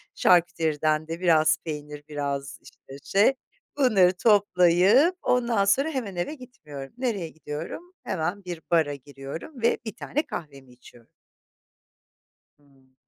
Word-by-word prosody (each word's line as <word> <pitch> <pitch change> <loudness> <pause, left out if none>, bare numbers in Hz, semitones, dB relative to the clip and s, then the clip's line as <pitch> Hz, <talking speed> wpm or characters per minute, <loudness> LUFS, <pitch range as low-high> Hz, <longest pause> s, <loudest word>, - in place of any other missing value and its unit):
şarküteriden 155 -3 +2
de 165 +1 -5
biraz 155 -3 +4
peynir, 150 -2 -7
biraz 140 -1 -4
işte 135 +1 -14
şey... 205 +7 +3 0.4
Bunları 195 -9 +4
toplayıp, 205 - +4
ondan 235 -5 +1
sonra 275 +10 +2
hemen 235 - -4
eve 175 - -2
gitmiyorum. 150 - -11
Nereye 215 -10 -2
gidiyorum? 160 - -7
Hemen 180 +3 -3
bir 175 -2 -6
bara 160 -4 +3
giriyorum 140 - -9
ve 235 - +3
bir 220 0 -6
tane 295 +4 -2
kahvemi 140 -6 -8
içiyorum. 120 -1 -18 1.5
Hımm. 135 -2 -28
170 Hz, 120 wpm, -25 LUFS, 145-210 Hz, 1.5 s, biraz